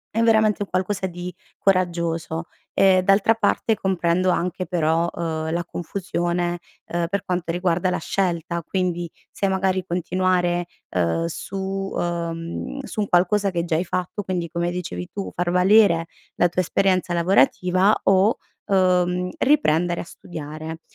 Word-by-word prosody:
è 225 - +2
veramente 220 -2 +3
un - - -10
qualcosa 190 +1 -1
di 180 0 -6 0.2
coraggioso. 170 -3 0 0.3
Ehm, 190 -1 +5
d'altra 195 +3 +4
parte 225 0 +1
comprendo 185 -2 +1
anche 180 +1 -1
però, 165 0 +1
uhm, 160 -1 -3
la 170 0 -1
confusione, 175 -1 -2 0.3
uhm, 170 0 -1
per 200 0 -2
quanto 175 -2 -1
riguarda 180 0 0
la - - 0
scelta, 170 -2 -1
quindi 175 -3 -2 0.2
se 195 - -1
magari 190 -1 +1
continuare, 175 0 0 0.3
uhm, 90 - +1
su, 180 +3 -5 0.4
uhm, 170 +6 -3
su 220 -4 -4
un 205 - -1
qualcosa 195 +3 +3
che 170 -1 -1
già 165 - 0
hai 165 - +1
fatto, 185 +4 -3
quindi 180 -2 -2
come 170 +1 -2
dicevi 90 - -5
tu, 200 -1 -5
far 175 0 0
valere 180 -2 +5 0.3
la 175 - +4
tua 175 +1 0
esperienza 185 0 +1
lavorativa 185 +3 +3
o, 195 +4 +4 0.3
uhm, 180 -1 +2
riprendere 175 - +2
a - - -5
studiare. 160 -1 -8
180 Hz, 145 wpm, -23 LUFS, 170-190 Hz, 0.4 s, Ehm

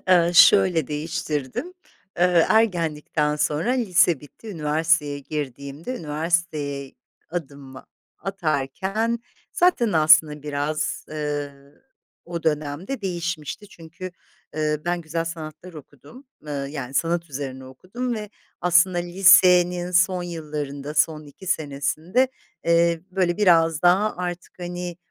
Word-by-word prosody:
ııı, 175 -1 +4
şöyle 180 -5 +6
değiştirdim, 150 - -4 0.5
ııı, 180 -2 +5
ergenlikten 160 -8 +1
sonra 150 +8 0
lise 180 - +3
bitti, 150 +9 -14
üniversiteye 155 -3 0
girdiğimde 140 - -6
üniversiteye 150 -3 -2 0.4
adımımı 140 -5 -7 0.3
atarken 195 +6 -2 0.3
zaten 350 - +2
aslında 155 -2 +5
biraz, 150 +1 -2
ııı, 145 - -5 0.4
o 170 -1 -5
dönemde 155 - -2
değişmişti. 175 0 -4
Çünkü, 170 +1 -10 0.5
ııı, 150 0 -1
ben 175 0 -1
güzel 165 0 -3
sanatlar 165 +1 -8
okudum, 155 - -14 0.2
ııı, 140 -2 -4
yani, 135 -3 -6
sanat 170 +1 0
üzerine 130 -1 -6
okudum 215 - -5
ve 210 -1 -6 0.3
aslında 180 +1 +4
lisenin 180 0 +5
son 180 +1 +3
yıllarında, 150 -4 -5
son 155 0 +1
2 145 +6 -14
senesinde, 155 - 0 0.4
eee, 170 0 +3
böyle, 180 -2 0
biraz 165 -6 +3
daha 190 +5 +3
artık, 180 0 -6
hani, 175 0 -5
165 Hz, 110 wpm, -23 LUFS, 150-180 Hz, 0.5 s, şöyle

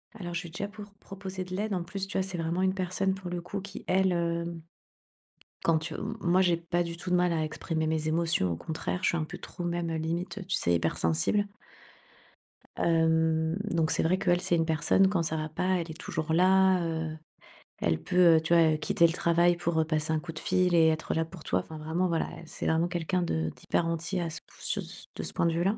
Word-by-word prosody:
Alors 175 -5 -6
je 170 - -1
lui 170 - -8
ai - - -16
déjà 200 +4 -3
pour 205 0 -11
proposer 190 -1 -7
de 185 0 -6
l'aide. 210 +2 -2
En 180 -2 -1
plus, 195 +2 -5
tu 200 - -3
vois, 190 - +2
c'est 190 - -5
vraiment 165 +2 -1
une 190 0 +2
personne 190 +1 0
pour 190 -2 -7
le 175 -1 -3
coup 200 +3 -5
qui 200 +1 -9
elle, 190 0 +3
hem, 170 -1 -1 1.0
quand 165 -1 +3
tu 160 +1 -5
m 225 - -4
moi, 180 +2 +3
j'ai 175 -2 +3
pas 170 +1 -1
du 170 0 -6
tout 180 - -6
de - - +4
mal 180 -1 +3
à 160 -1 0
exprimer 160 +1 -2
mes 155 0 0
émotions, 160 - +1
au - - -1
contraire, 160 - -3
je - - +4
suis 170 - 0
un 155 - 0
peu - - -8
trop 175 - -8
même, 175 -1 -1
heu, 160 - -1
limite, 175 +4 -3
tu 185 - +1
sais, 85 - +1
hypersensible 80 - +1 1.3
hem, 160 -1 +2
donc 165 -3 +1
c'est - - +2
vrai 180 +3 +2
qu'elle, 175 -1 +2
c'est 175 - +1
une 165 -1 +2
personne 160 +4 +3
quand 190 -3 +1
ça 160 0 -1
va 155 0 -2
pas, 180 +4 0
elle 165 -1 -4
est 160 - -10
toujours 160 0 -3
là, 185 +1 +5
heu, 160 -1 -2 0.6
elle 80 -1 0
peut, 175 - +5
heu, 160 - +2
tu 160 +2 0
vois, 165 -2 +6
heu, 155 - 0
quitter 170 +2 +3
le 165 - +4
travail, 170 0 +3
pour, 170 -1 -1
heu, - - +4
passer 155 0 0
un 155 - +1
coup 165 +1 -7
de 155 - -7
fil 180 -1 +2
et 165 -1 +6
être 155 0 -1
là 160 0 +1
pour 165 -1 -12
toi. 90 - +1
Enfin, 155 +11 -8
vraiment, 160 +4 -1
voilà, 165 -2 0
elle, 165 - -11
c'est - - -6
vraiment 160 +2 +2
quelqu'un 175 +1 -1
de 80 - -1
d'hyper 170 - -1
entier 170 +3 -2
à 170 - -2
ce 165 - -6
p - - -65
sur - - -2
ce - - -10
de 80 - -3
ce 80 -1 -4
point - - +1
de 170 - +3
vue-là. 190 +6 +1
170 Hz, 250 wpm, -29 LUFS, 160-185 Hz, 1.3 s, vois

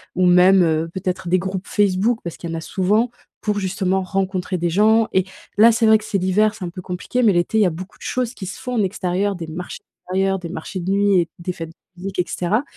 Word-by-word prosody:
ou 185 - +2
même, 180 +1 +6
heu, 160 0 +1
peut-être 185 -1 -3
des 180 +2 +3
groupes 190 +1 -4
Facebook, 205 +3 +1
parce 170 - -6
qu'il 170 - -6
y - - -4
en - - -2
a - - -5
souvent 205 +8 +1 0.3
pour, 210 -1 -1
justement, 190 0 0
rencontrer 185 -1 -2
des 175 0 0
gens 215 +5 +3
et 190 -1 +2 0.3
là, 225 +2 +7
c'est 225 +1 +2
vrai 220 0 +7
que 215 - -11
c'est 210 -2 -1
l'hiver, 200 +3 +2
c'est 215 - -8
un - - -4
peu 185 +2 -8
compliqué 185 +8 -2
mais 215 -4 +5
l'été 175 +5 +1
il - - +5
y - - +5
a - - +3
beaucoup 180 +5 -9
choses 250 -1 -2
qui 200 - -8
se 190 - -6
font 250 0 -4
en 220 - +2
extérieur, 195 +1 -1
des 170 -2 -6
marchés 175 +3 -7
d'extérieur, 195 +1 -2
des 175 - -6
marchés 185 +2 -6
de 180 +1 -4
nuit 200 -1 +3
et 170 -1 0
des 175 +1 -3
fêtes 165 -2 -7
de 175 +2 -21
musique 190 0 -5
et 180 - +2
cetera 205 +8 0
190 Hz, 260 wpm, -21 LUFS, 180-205 Hz, 0.3 s, là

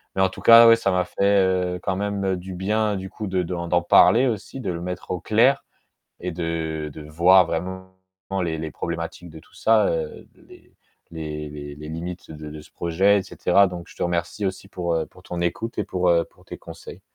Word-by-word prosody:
Mais 95 - +1
en 95 - +4
tout - - -11
cas, 115 0 +9
ouais, 115 - +7
ça 100 -4 0
m'a 90 0 +2
fait, 100 +2 +2 0.3
heu, - - -6
quand 95 - -1
même 100 -2 -1
du 95 +1 -8
bien 105 +3 0
du 95 0 -6
coup, 105 - -7
de 95 -1 0
d'en 85 0 -4
d'en 85 +1 +2
parler 115 +8 +5
aussi 120 +3 -4
de 95 -7 -2
le 85 - -4
mettre 90 +1 -6
au 90 - -2
clair 120 +9 +3 0.5
et 90 - -4
de 80 -2 -3
de 80 - -9
voir 85 +5 +5
vraiment, 95 +3 -5 0.5
les 80 -2 -2
les 80 0 -4
problématiques 85 +2 -5
de 80 - -11
tout 80 - -22
ça, 110 -2 +3
heu, 80 -2 -4
les - - -19 0.3
les 75 -2 -6
les 75 -1 -8
les 75 +1 -9
limites 85 +3 -6
de 75 -1 -8
de 75 0 -9
ce - - -18
projet 95 +5 +2
et - - -5
cetera 100 +2 +3
donc 90 -2 -6
je - - -16
te - - -3
remercie 85 +4 -2
aussi 95 0 -4
pour, 90 -3 -3
heu, 80 -1 0
pour 90 - -19
ton 90 -1 -6
écoute 110 +7 -3
et - - +1
pour, 90 -1 0
heu, 85 -1 +3
pour - - -24
tes - - -8
conseils. - - -11
90 Hz, 225 wpm, -23 LUFS, 85-95 Hz, 0.5 s, cas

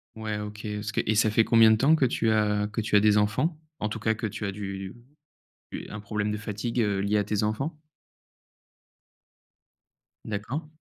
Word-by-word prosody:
Ouais 110 -1 -4
OK, 105 0 -7
est-ce 105 0 -4
que - - +1
et 110 - +2
ça 110 +1 +4
fait 110 +2 +4
combien 115 -1 +6
de - - +6
temps 140 +7 +4
que 145 - +2
tu 115 -2 +1
as 105 -1 +1
que 110 - -3
tu 110 -1 0
as 105 - +7
des 105 0 +4
enfants? 130 +11 +1 0.2
En 105 - -1
tout - - -5
cas 110 - +1
que 110 +1 -3
tu 105 +1 -5
as 100 - -1
du 95 -1 -6 0.8
du - - -6
un 105 - -7
problème 105 0 -2
de 105 - -1
fatigue, 105 +3 -3
heu, 100 -3 +1
lié 100 +2 +1
à 105 - +2
tes 105 0 -1
enfants? 135 +9 -2 2.5
D'accord. 110 +9 -4
105 Hz, 200 wpm, -27 LUFS, 105-110 Hz, 2.5 s, as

